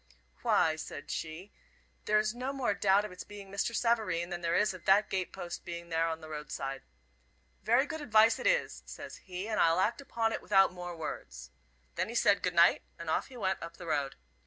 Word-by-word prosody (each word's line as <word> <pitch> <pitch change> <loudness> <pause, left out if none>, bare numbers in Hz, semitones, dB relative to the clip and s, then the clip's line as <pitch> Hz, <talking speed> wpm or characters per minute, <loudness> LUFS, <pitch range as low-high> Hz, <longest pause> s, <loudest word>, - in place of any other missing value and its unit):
"Why," 160 -1 +3
said 145 -2 -7
she, 165 +5 -5 0.5
"there 215 - +3
is 215 0 +1
no 250 +3 -3
more 260 -6 0
doubt 200 +1 +3
of 210 - -7
its 180 - -8
being 200 -2 -11
Mr. 200 +4 -1
Savareen 220 -8 +1
than 175 0 -4
there 170 0 0
is 210 -1 +3
of 185 - -11
that 200 +2 +4
gate 190 -2 -1
post 175 -1 -6
being 170 -1 -7
there 165 0 +1
on 160 0 -3
the 160 - -9
road 150 -2 -7
side. 135 0 -4 0.8
'Very 240 +6 +3
good 315 0 -5
advice 220 -4 +5
it - - 0
is,' - - +1
says - - -8
he, 185 +2 -6
'and 215 -1 -1
I'll 165 +1 +4
act 225 +8 +1
upon 225 -4 -1
it - - -3
without 195 -3 +4
more 175 -1 -6
words.' - - -7 0.4
Then 185 +4 -2
he 235 - -6
said 205 -4 +4
'good 180 -1 -1
night,' 170 0 +6 0.2
and 170 -2 -4
off - - 0
he 260 - -12
went 190 -4 -1
up 170 0 -8
the 175 - -9
road. 140 -4 -1
190 Hz, 220 wpm, -31 LUFS, 170-215 Hz, 0.8 s, night